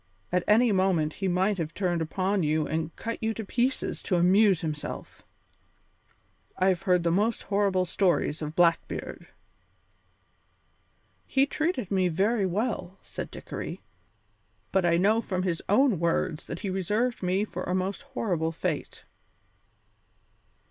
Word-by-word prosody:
At 180 Hz, 0 st, +1 dB
any 225 Hz, +2 st, +5 dB
moment 185 Hz, -6 st, +2 dB
he 195 Hz, -, -3 dB
might 190 Hz, +2 st, +1 dB
have 165 Hz, -1 st, -4 dB
turned 175 Hz, -4 st, 0 dB
upon 190 Hz, +4 st, 0 dB
you 155 Hz, 0 st, +1 dB
and 160 Hz, +2 st, -3 dB
cut 230 Hz, 0 st, -5 dB
you 220 Hz, 0 st, -1 dB
to 220 Hz, -, -5 dB
pieces 250 Hz, +6 st, -1 dB
to 185 Hz, -, 0 dB
amuse 185 Hz, +1 st, +4 dB
himself. 155 Hz, -3 st, -5 dB, 1.4 s
I 185 Hz, +1 st, +3 dB
have 180 Hz, -2 st, +1 dB
heard 180 Hz, -2 st, +2 dB
the 170 Hz, -, +2 dB
most 210 Hz, +6 st, +1 dB
horrible 195 Hz, -2 st, +1 dB
stories 175 Hz, -4 st, +1 dB
of 150 Hz, +1 st, -5 dB
Blackbeard." 170 Hz, -2 st, 0 dB, 2.0 s
"He 270 Hz, 0 st, +3 dB
treated 285 Hz, -, -2 dB
me 190 Hz, -2 st, +3 dB
very 195 Hz, +4 st, +1 dB
well," 195 Hz, -1 st, -2 dB
said -, -, -6 dB
Dickory, -, -, -6 dB, 0.9 s
"but 190 Hz, -2 st, +2 dB
I 170 Hz, 0 st, +3 dB
know 210 Hz, +5 st, +3 dB
from 185 Hz, -4 st, -2 dB
his 175 Hz, -3 st, -1 dB
own 215 Hz, -, +4 dB
words 165 Hz, -2 st, 0 dB
that 170 Hz, -, -6 dB
he 195 Hz, -, -2 dB
reserved 210 Hz, +6 st, 0 dB
me 185 Hz, +3 st, +1 dB
for 185 Hz, -4 st, -6 dB
a 180 Hz, -, -1 dB
most 190 Hz, +6 st, -2 dB
horrible 195 Hz, -, -2 dB
fate." 165 Hz, -2 st, -4 dB
185 Hz, 140 wpm, -27 LUFS, 170-210 Hz, 2.0 s, any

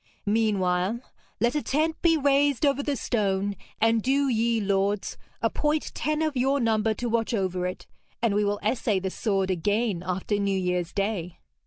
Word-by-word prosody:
Meanwhile, 205 Hz, -1 st, +1 dB, 0.4 s
let 240 Hz, +1 st, +2 dB
a 300 Hz, -, 0 dB
tent 315 Hz, +4 st, 0 dB
be 330 Hz, -2 st, +4 dB
raised 285 Hz, -1 st, +2 dB
over 280 Hz, 0 st, +2 dB
the 285 Hz, 0 st, -1 dB
stone, 200 Hz, -5 st, 0 dB, 0.2 s
and 225 Hz, 0 st, +3 dB
do 275 Hz, +4 st, +2 dB
ye 230 Hz, -1 st, +1 dB
lords 200 Hz, 0 st, 0 dB, 0.3 s
appoint 300 Hz, 0 st, 0 dB
ten 305 Hz, +1 st, -1 dB
of 310 Hz, -3 st, -1 dB
your 270 Hz, +3 st, +2 dB
number 220 Hz, -2 st, +1 dB
to 245 Hz, -, -3 dB
watch 230 Hz, 0 st, 0 dB
over 185 Hz, -3 st, -1 dB
it, 180 Hz, -, -6 dB, 0.3 s
and 230 Hz, -3 st, +1 dB
we 210 Hz, +1 st, +2 dB
will 205 Hz, 0 st, 0 dB
essay 220 Hz, -1 st, +1 dB
the 190 Hz, 0 st, -2 dB
sword 195 Hz, -3 st, 0 dB
again 205 Hz, +2 st, 0 dB
after 185 Hz, +3 st, -1 dB
New 200 Hz, -1 st, +1 dB
Year's 180 Hz, -2 st, -1 dB
Day.' 195 Hz, -4 st, -2 dB
215 Hz, 170 wpm, -26 LUFS, 195-260 Hz, 0.4 s, be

